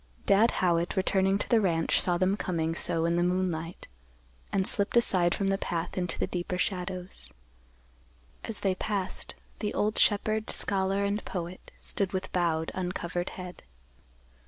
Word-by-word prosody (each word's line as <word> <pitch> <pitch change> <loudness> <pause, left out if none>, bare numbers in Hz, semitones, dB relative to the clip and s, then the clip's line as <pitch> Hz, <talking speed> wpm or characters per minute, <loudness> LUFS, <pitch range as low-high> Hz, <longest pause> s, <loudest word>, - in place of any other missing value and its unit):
Dad 210 +4 +5 0.2
Howitt, 170 +1 +1
returning 190 0 +2
to - - -4
the 230 -2 +4
ranch, 165 -4 +2
saw 175 -1 +1
them 185 +2 +2
coming 165 -5 -1
so 165 0 0
in 170 +1 +1
the - - +2
moonlight, 180 -2 -1 0.6
and 190 -1 +1
slipped 200 +4 +3
aside 180 -7 +3
from 200 - -1
the 195 0 +1
path 170 0 -3
into 180 -2 -1
the - - 0
deeper 180 0 -3
shadows. 180 - -3 1.1
As 225 - -4
they 195 -2 +2
passed, 195 0 -2 0.2
the 210 - -2
old 210 +1 +1
shepherd, 215 +1 +2
scholar 195 0 +1
and 205 +1 -1
poet 180 0 -6
stood 195 -2 -1
with 190 0 -3
bowed, 165 -3 0
uncovered 180 -1 -3
head. 180 -1 -8
185 Hz, 155 wpm, -29 LUFS, 175-200 Hz, 1.1 s, Dad